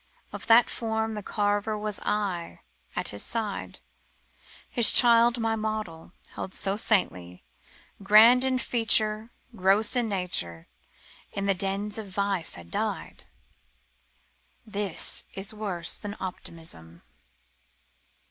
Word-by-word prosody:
Of - - -8
that 230 +1 +6
form 220 -1 -3
The 210 - -5
carver 205 +1 -1
was 210 -1 -3
I 195 -5 -3 0.3
at - - +1
his 100 - -5
side; 220 -3 -4 0.9
His 235 -3 +6
child 235 0 +7
my 225 -1 0
model, 215 -7 -5 0.2
held 190 - -7
so 195 0 0
saintly, 90 - -1 0.6
Grand 220 +5 +6
in 260 -1 0
feature. 220 -2 +1 0.3
Gross 200 +5 +2
in 240 -3 0
nature, 130 - -4 0.7
In 200 - -3
the 200 - +2
dens 200 +3 -3
of 215 - -8
vice 195 -3 -1
had 85 -1 -13
died. - - -4 1.4
This 205 -5 +1
is 195 +2 -5
worse 195 -6 -4
than 205 0 -7
optimism. 160 - -7
205 Hz, 115 wpm, -26 LUFS, 185-220 Hz, 1.4 s, child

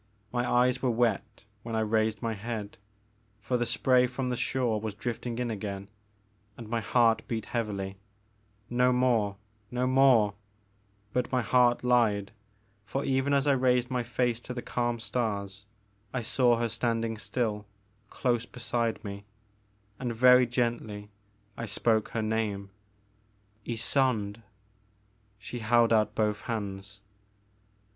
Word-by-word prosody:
My 120 0 -1
eyes 125 +1 +3
were 130 - +1
wet 115 -3 0 0.2
when 115 +1 -5
I 110 - +1
raised 110 +1 0
my 115 -1 0
head, 105 -1 -5 0.3
— 105 0 -36
^for 125 - +1
the 120 - 0
spray 125 -1 +3
from 125 +1 -3
the 125 - 0
shore 120 -3 0
was 110 -2 -4
drifting 120 +1 -4
in 120 -1 -1
again, 100 -1 -5 0.3
— 105 0 -39
and 115 - -8
my 115 +1 -1
heart 115 +3 +3
beat 110 -2 -3
heavily; 100 -4 -3 0.7
No 125 +1 +3
more, 120 -5 +2 0.3
no 125 +1 -1
more, 130 -6 +5 0.3
' 100 0 -39
' 100 +1 -38
But 125 -1 0
my 125 -2 +1
heart 120 +1 +3
lied, 110 -5 +2 0.5
for 135 +8 -3
even 135 +1 +1
as 140 0 +3
I 145 - +4
raised 125 -1 +2
my 125 -1 +1
face 120 -1 0
to 125 +1 -8
the 120 - -5
calm 120 -1 -1
stars, 105 -3 -3 0.5
I 125 - -1
saw 120 +1 +3
her 120 0 0
standing 115 -1 -1
still, 110 -2 -2 0.4
close 120 -2 0
beside 120 -1 -2
me; 100 0 -7 0.7
and 120 -2 -3
very 125 +1 +6
gently 115 -4 -2 0.4
I 115 - -5
spoke 110 +2 +1
her 115 - -2
name, 105 -3 -2 1.0
Ysonde. 115 -3 0 1.0
She 110 +4 -7
held 115 +1 +4
out 110 -1 +2
both 105 -1 0
hands. 100 -3 -5
115 Hz, 145 wpm, -29 LUFS, 105-125 Hz, 1.0 s, very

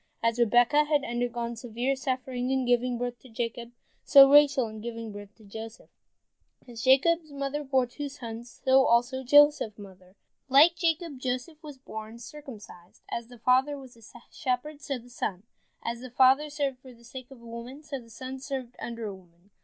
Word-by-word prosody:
As 230 +1 +1
Rebekah 245 +6 +4
had 295 -2 +1
undergone 240 -1 -3
severe 240 +3 -2
suffering 255 -1 -3
in 265 -1 +1
giving 245 0 +1
birth 245 0 -4
to 260 - -16
Jacob, 235 0 -4 0.3
so 275 -1 +9
Rachel 285 -3 +5
in 215 0 -9
giving 230 -1 -6
birth 205 0 -11
to 220 - -20
Joseph. 220 +2 -10 0.8
As 235 -2 -8
Jacob's 310 +6 +3
mother 280 +1 -3
bore 265 -2 +2
two 285 +4 -6
sons, 235 -2 -9
so 265 0 +6
also 245 +3 +2
Joseph's 290 -5 +5
mother. 190 -2 -14 0.3
Like 300 +6 +7
Jacob, 330 -4 -1
Joseph 255 +5 -4
was 295 -4 -10
born 220 -3 -9
circumcised. 225 -8 -12
As 235 -1 -4
the 245 0 -14
father 260 +5 +2
was 260 -3 -12
a 230 - -20 0.3
shepherd, 285 +2 -3
so 275 -2 -3
the 240 0 -14
son. 200 -6 -4 0.4
As 235 0 -3
the 255 +1 -9
father 265 +4 +4
served 285 -3 -2
for 255 0 -14
the 235 - -21
sake 250 +1 -10
of 270 -3 -14
a 235 - -16
woman, 235 +5 -9
so 280 -2 -5
the 230 -2 -16
son 260 +3 -7
served 260 -3 -6
under 230 -1 -5
a 205 - -4
woman. 180 +1 -19
250 Hz, 185 wpm, -28 LUFS, 230-275 Hz, 0.8 s, so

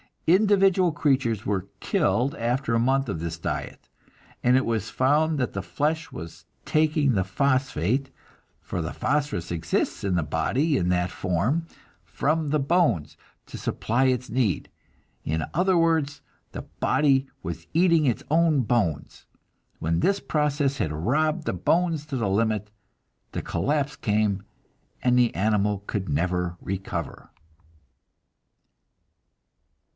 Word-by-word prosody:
Individual 190 -1 +4
creatures 130 -7 +1
were 100 -2 -1
killed 130 +4 +1
after 120 +1 -1
a 115 - +3
month 135 +2 +1
of 80 - -3
this 85 0 -4
diet, 80 - -5 0.5
and 125 +1 +4
it 130 - +3
was 115 -2 -1
found 150 +4 +2
that 125 -4 -1
the 100 - -3
flesh 155 - -2
was 80 +1 -9 0.2
taking 155 -2 +2
the 95 -3 +2
phosphate 130 - 0 0.5
for - - -4
the - - -4
phosphorus 145 - -1
exists 85 -1 -1
in 95 -2 0
the 85 - +1
body 125 - 0
in 90 - 0
that 90 0 +1
form 105 - -1 0.4
from 150 - -1
the 150 +1 +2
bones 140 - +1 0.3
to - - -9
supply 120 +4 0
its 125 -1 0
need. 115 -8 0 0.5
In 80 +1 -1
other 180 +3 +3
words, 160 -4 +1 0.3
the - - -5
body 135 -2 +1 0.2
was 85 0 -6
eating 165 -2 +4
its 125 -4 0
own 160 -3 +4
bones! 105 - -1 0.5
When 80 +1 0
this 200 - +2
process 145 -2 0
had 80 - -1
robbed 155 - 0
the - - -1
bones 160 - +1
to 145 - -4
the 115 -6 0
limit, 105 0 0 0.6
the - - -2
collapse 145 0 -1
came, 105 -2 0 0.6
and 125 0 +4
the 120 -2 +2
animal 105 -1 +1
could 100 -2 -3
never 90 +3 -1
recover." 90 -5 -5
125 Hz, 135 wpm, -25 LUFS, 95-150 Hz, 0.6 s, Individual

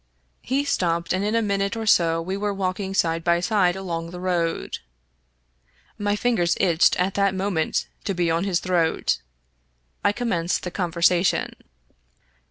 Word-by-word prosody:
He 270 +3 0
stopped, 170 -9 0
and 185 +1 0
in 210 +2 0
a 230 - +2
minute 200 +1 0
or 225 - -3
so 165 -5 +3
we 190 +3 -3
were 205 0 -2
walking 190 0 -2
side 165 -2 +1
by 170 0 +3
side 180 -1 +2
along 170 -3 -4
the 180 +1 -8
road 175 -2 -1 1.2
My 205 -1 0
fingers 210 -7 +1
itched 170 -3 +3
at 185 +2 +1
that 200 -1 +1
moment 185 -4 -1 0.2
to 195 - -1
be 170 -1 +1
on 165 +2 +1
his 190 -3 +1
throat. 175 -3 0 0.8
I 205 - +4
commenced 195 -7 -1
the 180 - -4
conversation. 175 0 +1
185 Hz, 155 wpm, -23 LUFS, 170-200 Hz, 1.2 s, I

